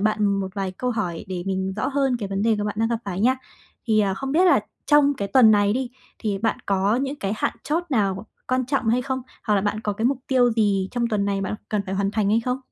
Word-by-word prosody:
bạn 215 0 +1
một 195 -1 0
vài 195 -2 -2
câu 250 +7 -2
hỏi 180 -8 -3
để 180 -2 -3
mình 190 0 -1
rõ - - -1
hơn 270 -2 +1
cái 200 -3 -4
vấn 195 +1 -2
đề 225 -1 +3
của 210 - -1
bạn 210 0 -3
đang 225 - +2
gặp 230 -1 -1
phải 195 -1 -4
nha. 255 +4 +3 0.5
Thì, 215 -2 +3
ờ, 195 -2 +1
không 270 +5 -4
biết 350 +4 +4
là 350 - +5 0.3
trong 295 -1 +5
cái 200 -3 -3
tuần 230 0 +6
này 205 -1 +4
đi, 255 +1 -2 0.3
thì 205 -3 -2
bạn 225 +2 0
có 200 +3 +2
những 275 +2 -2
cái 195 +1 -1
hạn - - -1
chót 330 +4 0
nào 200 -4 0 0.2
quan 255 -1 +1
trọng 265 -3 0
hay 245 +3 +2
không? 260 0 -3 0.2
Hoặc 210 - +2
là 195 - +3
bạn 210 +2 -1
có 210 -2 -2
cái 220 +3 -4
mục 270 -1 +1
tiêu 245 -3 +4
gì 200 -4 +1
trong 235 -1 -1
tuần 210 -3 0
này 200 -1 -1
bạn 195 - -2
cần 210 -2 0
phải 190 - -3
hoàn 195 0 0
thành 210 -2 0
hay 225 +2 +3
không? 250 +2 -2
215 Hz, 275 wpm, -23 LUFS, 200-250 Hz, 0.5 s, tuần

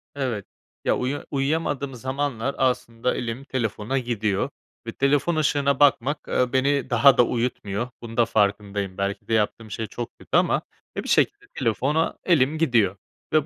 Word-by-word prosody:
Evet, 125 -8 -2 0.4
ya, - - +3
uyu 135 +3 -2
uyuyamadığım 140 -1 -1
zamanlar 130 0 -2
aslında 125 -2 0
elim 120 +2 -4
telefona 120 -1 -2
gidiyor 110 -5 -1 0.4
ve - - -2
telefon 145 +4 +2
ışığına 140 -2 +1
bakmak, 145 +1 +3
ııı, 125 -1 +1
beni 135 0 +2
daha 135 +1 +6
da 125 - +7
uyutmuyor. 120 -2 -2
Bunun 115 0 -8
da 120 - +5
farkındayım. 100 -2 0
Belki 100 0 -3
de - - -1
yaptığım 110 0 0
şey 110 +1 -3
çok 120 0 -7
kötü - - 0
ama, - - +2 0.4
e, - - -2
bir - - -6
şekilde 410 0 +2
telefona 135 +7 0
elim 155 -3 +3
gidiyor 115 - +2 0.4
ve 155 -2 +4
125 Hz, 155 wpm, -24 LUFS, 110-140 Hz, 0.4 s, da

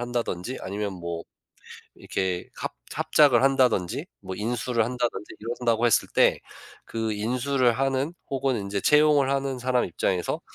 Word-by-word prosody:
한다든지 120 -2 -3
아니면 100 +1 -3
뭐 85 -2 -5 0.7
이렇게 90 -2 -3
합 - - -4 0.2
합작을 140 -6 +4
한다든지, 130 -9 +2
뭐 95 - -7
인수를 115 +2 0
한다든지 120 -2 -3
이런다고 115 0 0
했을 115 - +3
때, - - +4 0.5
그 110 -1 -3
인수를 125 +4 +1
하는 135 +5 0 0.2
혹은 135 -1 0
인제 100 -1 -3
채용을 150 +1 +4
하는 135 -1 -1
사람의 125 0 +1
입장에서 90 +1 -1
120 Hz, 320 characters per minute, -26 LUFS, 105-130 Hz, 0.7 s, 합작을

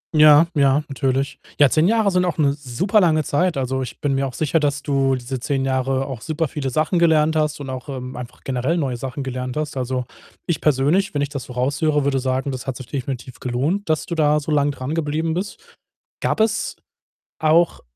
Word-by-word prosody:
Ja, 150 +1 +8
ja, 140 0 +3
natürlich. 135 0 -1 0.2
Ja, 145 -2 +6
10 160 +3 +3
Jahre 220 -2 +3
sind 180 -1 +2
auch 175 -2 -2
'ne 140 -2 +3
super 150 - +1
lange 155 -3 +3
Zeit. 175 +4 0
Also, 130 0 -1
ich 130 - -6
bin 145 -2 0
mir 135 0 0
auch 130 - -8
sicher, 160 +1 +1
dass 145 -1 -1
du 135 -2 +1
diese 130 +1 -5
10 135 +1 -1
Jahre 130 0 0
auch 130 -4 -6
super 160 0 -1
viele 135 -1 -3
Sachen 155 +6 +1
gelernt 160 -2 +3
hast, 150 -1 0
und 135 -2 -6
auch, 130 -1 -7
ähm, 130 -2 -6
einfach 125 -1 -9
generell 130 +6 -1
neue 135 -6 -1
Sachen 135 +3 -5
gelernt 125 0 -4
hast. 155 -2 -3
Also, 130 -1 -2 0.4
ich 170 - -1
persönlich, 150 +7 +2
wenn 145 - +1
ich 145 - -2
das 140 -3 -6
so 125 - -9
raus 130 +5 -1
höre, 150 -2 +2
würde 135 -1 +1
sagen, 130 +1 -1
das 130 +1 -6
hat 130 -2 -3
sich 130 - -8
definitiv 130 -1 -5
gelohnt, 145 +11 -1
dass 155 -1 +1
du - - -5
da 150 -2 +3
so 150 +1 -5
lang 145 -1 +3
dran 140 +1 -4
geblieben 160 0 -1
bist. 320 - -6 0.5
Gab - - 0
es 220 -1 0 0.7
auch 160 +2 +3
145 Hz, 215 wpm, -21 LUFS, 130-155 Hz, 0.7 s, Ja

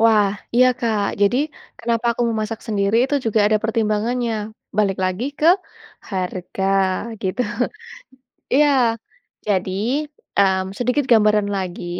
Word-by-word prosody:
Wah, 215 -3 +5 0.3
iya 250 +1 +6
Kak. 220 -4 0 0.2
Jadi 205 +5 +3 0.4
kenapa 230 0 -1
aku - - 0
memasak 220 0 -3
sendiri 205 0 +1
itu 285 +2 0
juga 220 -1 +2
ada 215 0 +3
pertimbangannya. 225 +1 0 0.4
Balik 195 -3 +2
lagi 185 +6 -1
ke 310 - +2 0.6
harga, 185 0 -3 0.6
gitu. 190 +6 -1 1.1
Iya 295 +2 +5 0.8
jadi, 210 +10 -1 0.3
mmm, 190 -1 +2
sedikit 250 +3 0
gambaran 210 -2 +4
lagi, 180 -2 -5
215 Hz, 115 wpm, -21 LUFS, 195-235 Hz, 1.1 s, iya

